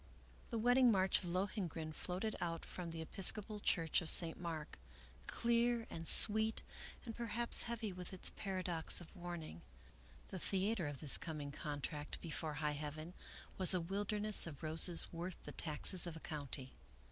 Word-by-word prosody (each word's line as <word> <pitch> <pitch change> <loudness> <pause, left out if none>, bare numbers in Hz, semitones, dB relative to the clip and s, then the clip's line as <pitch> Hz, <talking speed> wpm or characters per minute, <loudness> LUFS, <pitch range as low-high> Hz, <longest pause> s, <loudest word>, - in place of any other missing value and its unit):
V - - -25
The 230 - -4
wedding 245 +2 +4
march 190 -2 +2
of - - -8
Lohengrin 175 -4 -4
floated 185 +7 -4
out 165 -1 -4
from 175 -2 -7
the 165 0 -6
Episcopal 205 +5 +2
Church 165 -5 0
of 165 - -2
St. 165 -2 +2
Mark, 165 - -7 0.5
clear 235 0 0
and 165 0 -7
sweet, 220 +1 +4 0.4
and 225 -2 -7
perhaps 235 0 +6
heavy 225 -4 -4
with 180 -1 -9
its 190 - -2
paradox 185 -4 -2
of 175 +2 -14
warning. 175 - -8 0.7
The 190 - -7
theater 195 -1 -2
of 145 -2 -7
this 150 -4 +6
coming 150 -3 -6
contract 145 0 -6
before 160 -2 -5
high 150 0 -2
heaven 155 +3 -7 0.5
was 185 0 +9
a - - +1
wilderness 205 +3 +2
of 155 -1 -10
roses 165 +2 +5
worth 170 +2 -6
the - - -8
taxes 170 +4 +1
of 170 - -7
a - - -9
county. 140 -5 -7
175 Hz, 160 wpm, -37 LUFS, 160-205 Hz, 0.7 s, was